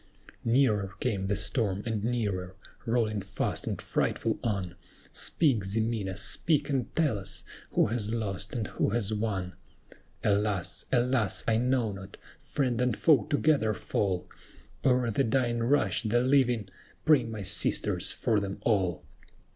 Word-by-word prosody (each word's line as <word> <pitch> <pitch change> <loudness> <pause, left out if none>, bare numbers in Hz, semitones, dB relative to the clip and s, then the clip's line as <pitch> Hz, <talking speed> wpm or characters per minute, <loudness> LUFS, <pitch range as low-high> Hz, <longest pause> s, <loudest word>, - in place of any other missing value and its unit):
Nearer 110 -6 +2
came 100 -6 -1
the 100 - +1
storm 105 -2 0
and 110 -3 -2
nearer, 100 -6 -2 0.3
rolling 110 -3 +1
fast 95 0 -2
and - - -2
frightful - - -1
on! 100 -6 -2 0.4
Speak, 135 -11 +1
Ximena, 105 -1 -1
speak 145 - +1
and 130 -4 -2
tell 150 -11 +1
us, 95 - -3 0.3
who - - +4
has 110 -1 -1
lost, 100 -3 -3
and 115 -3 -1
who - - -1
has 110 -1 0
won? 100 -4 -2 0.7
"Alas! 100 -3 0
alas! 120 -5 +2
I 110 -1 +3
know 125 -3 +1
not; 95 0 -10 0.2
friend 125 -4 -1
and 125 -3 +1
foe 155 -4 +4
together 145 -7 +2
fall, 95 0 -2 0.6
O'er 125 -2 +2
the 135 - +1
dying 120 -1 +1
rush 115 -5 +2
the 120 +1 +1
living: 125 -5 +2 0.4
pray, 150 -5 +5
my 110 -3 -6
sisters, 95 - +2
for 110 -2 +1
them 100 -1 -4
all! 95 -7 0
110 Hz, 140 wpm, -29 LUFS, 100-125 Hz, 0.7 s, pray